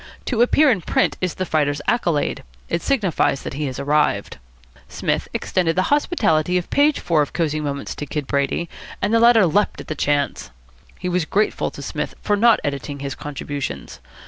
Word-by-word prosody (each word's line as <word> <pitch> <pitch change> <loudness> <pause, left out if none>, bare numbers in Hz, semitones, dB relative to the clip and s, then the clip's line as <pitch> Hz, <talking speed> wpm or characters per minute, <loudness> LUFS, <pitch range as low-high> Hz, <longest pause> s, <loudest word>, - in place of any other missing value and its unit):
To 235 -3 0
appear 285 +4 +5
in 205 -7 0
print - - +1
is 180 -3 -1
the 185 - -2
fighter's 145 -3 0
accolade. 170 -11 +1 0.3
It 170 - -1
signifies 195 - +1
that - - -5
he 150 +2 -3
has 130 - -5
arrived. 150 +2 0 0.5
Psmith - - -1
extended 170 -3 0
the 185 - +2
hospitality 180 - +2
of 180 - -4
page 290 +1 +3
four 165 -3 +2
of 145 - -2
Cosy 155 -3 0
Moments 140 -2 -4
to 145 - -5
Kid 150 +1 -3
Brady, 140 +5 -1 0.3
and 205 +3 0
the 230 - +5
latter 230 -3 +6
leaped 200 +5 +1
at - - -9
the - - -1
chance. 145 - -1 0.5
He 180 - -4
was 180 -2 0
grateful 210 +6 0
to - - -9
Psmith - - -4
for 205 - +2
not 225 +1 +5
editing 140 0 -3
his 140 -1 -3
contributions. 140 - -6
165 Hz, 185 wpm, -21 LUFS, 145-205 Hz, 0.5 s, latter